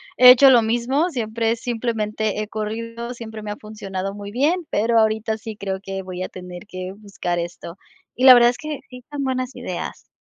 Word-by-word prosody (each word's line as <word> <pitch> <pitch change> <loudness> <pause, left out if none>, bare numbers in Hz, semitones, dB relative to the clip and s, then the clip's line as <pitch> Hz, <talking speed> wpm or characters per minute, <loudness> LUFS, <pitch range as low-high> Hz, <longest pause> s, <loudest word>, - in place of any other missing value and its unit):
he 250 - +9
hecho 265 +2 +9
lo 240 -3 +6
mismo, 240 +9 +1
siempre 230 -3 -1
simplemente 220 -3 -2
he 215 - -3
corrido, 230 +3 -5
siempre 220 -2 -8
me 210 - -6
ha 210 - -4
funcionado 195 -3 -5
muy 200 0 -8
bien, 305 - +1
pero 225 +2 +2
ahorita 220 0 +1
sí 220 0 -7
creo 195 -1 -3
que 195 -1 -5
voy 185 -1 -6
a - - -3
tener 180 +1 -10
que 185 -1 -6
buscar 200 -4 -4
esto, 170 +1 -6 0.4
y 255 - +1
la 255 -2 +11
verdad 240 0 +6
es 245 - -10
que 305 -3 -5
sí 250 -1 -11
son 285 -1 -3
buenas 255 -1 -2
ideas. - - -6
220 Hz, 200 wpm, -22 LUFS, 205-245 Hz, 0.4 s, la